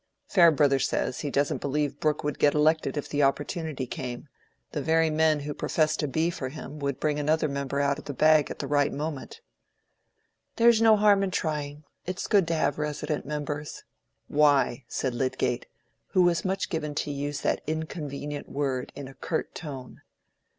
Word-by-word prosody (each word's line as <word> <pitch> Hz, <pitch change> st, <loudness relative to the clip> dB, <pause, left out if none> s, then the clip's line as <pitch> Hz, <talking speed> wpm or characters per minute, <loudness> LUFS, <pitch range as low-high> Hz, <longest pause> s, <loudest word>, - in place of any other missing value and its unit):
"Farebrother 150 Hz, -7 st, +4 dB
says, 125 Hz, -, -1 dB
he 145 Hz, -, -3 dB
doesn't 140 Hz, +1 st, 0 dB
believe 145 Hz, 0 st, -1 dB
Brooke 155 Hz, -1 st, 0 dB
would 150 Hz, -2 st, -3 dB
get 145 Hz, -, +4 dB
elected 155 Hz, +1 st, +2 dB
if 145 Hz, -, -3 dB
the 145 Hz, -, -1 dB
opportunity 145 Hz, 0 st, -1 dB
came: 125 Hz, 0 st, -6 dB, 0.4 s
the -, -, -3 dB
very 160 Hz, 0 st, +2 dB
men 155 Hz, -1 st, +2 dB
who 145 Hz, +1 st, -4 dB
profess 155 Hz, +1 st, +1 dB
to 150 Hz, -, -1 dB
be 160 Hz, +5 st, 0 dB
for 130 Hz, -6 st, -5 dB
him 150 Hz, +1 st, -8 dB
would 140 Hz, -2 st, -2 dB
bring 150 Hz, -1 st, 0 dB
another 155 Hz, +1 st, +1 dB
member 140 Hz, 0 st, -2 dB
out 140 Hz, 0 st, +1 dB
of -, -, -12 dB
the 145 Hz, -, -4 dB
bag 155 Hz, +1 st, +4 dB
at -, -, -6 dB
the -, -, -4 dB
right 145 Hz, 0 st, +2 dB
moment." 150 Hz, -, -5 dB, 1.1 s
"There's 235 Hz, -1 st, +5 dB
no 220 Hz, -1 st, +6 dB
harm 205 Hz, -1 st, +5 dB
in 195 Hz, -, 0 dB
trying. 150 Hz, -4 st, -3 dB, 0.2 s
It's 185 Hz, +1 st, -3 dB
good 195 Hz, -5 st, +3 dB
to 165 Hz, -, 0 dB
have 155 Hz, -, 0 dB
resident 150 Hz, 0 st, -3 dB
members." 150 Hz, 0 st, -4 dB, 0.4 s
"Why?" 145 Hz, -4 st, +3 dB
said 130 Hz, -2 st, -2 dB
Lydgate, 125 Hz, 0 st, -1 dB, 0.4 s
who 185 Hz, -, +3 dB
was 175 Hz, -1 st, +2 dB
much 190 Hz, +1 st, -2 dB
given 150 Hz, -3 st, -3 dB
to 145 Hz, -, -2 dB
use 145 Hz, +1 st, -3 dB
that -, -, 0 dB
inconvenient 150 Hz, -2 st, -4 dB
word 135 Hz, -3 st, -2 dB
in 140 Hz, -1 st, -7 dB
a 135 Hz, -, -11 dB
curt 160 Hz, -, -3 dB
tone. 135 Hz, -6 st, -8 dB
150 Hz, 180 wpm, -27 LUFS, 140-160 Hz, 1.1 s, no